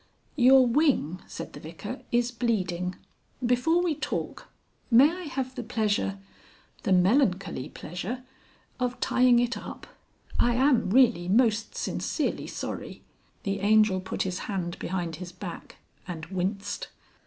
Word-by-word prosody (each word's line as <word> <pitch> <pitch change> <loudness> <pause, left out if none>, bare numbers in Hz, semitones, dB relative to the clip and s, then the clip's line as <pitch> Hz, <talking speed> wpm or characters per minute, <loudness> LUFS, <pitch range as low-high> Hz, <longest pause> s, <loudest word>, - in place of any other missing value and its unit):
"Your 260 0 +7
wing," 240 - +2
said - - -7
the - - -9
Vicar, - - -7
"is 240 0 +2
bleeding. 185 -7 -1 0.5
Before 285 +9 +3
we 345 -3 +1
talk, - - -4 0.4
may 265 +6 +7
I 360 +2 -6
have 265 -3 -3
the 255 - -5
pleasure 215 -4 0 0.6
the - - -1
melancholy 185 - +2
pleasure 195 +10 -6 0.6
of 250 0 -1
tying 250 -1 +4
it 240 0 +1
up? - - -8 0.5
I 240 0 +3
am 255 -5 +3
really 230 -6 +4
most 220 0 +2
sincerely - - -2
sorry...." - - -6 0.4
The 195 0 -1
Angel 210 -2 +4
put 185 - -2
his 185 -1 -3
hand 180 -4 -3
behind 175 -3 -3
his 180 0 -7
back 180 -1 -8 0.3
and 165 -3 -5
winced. 190 +3 -3
220 Hz, 130 wpm, -27 LUFS, 185-250 Hz, 0.6 s, Your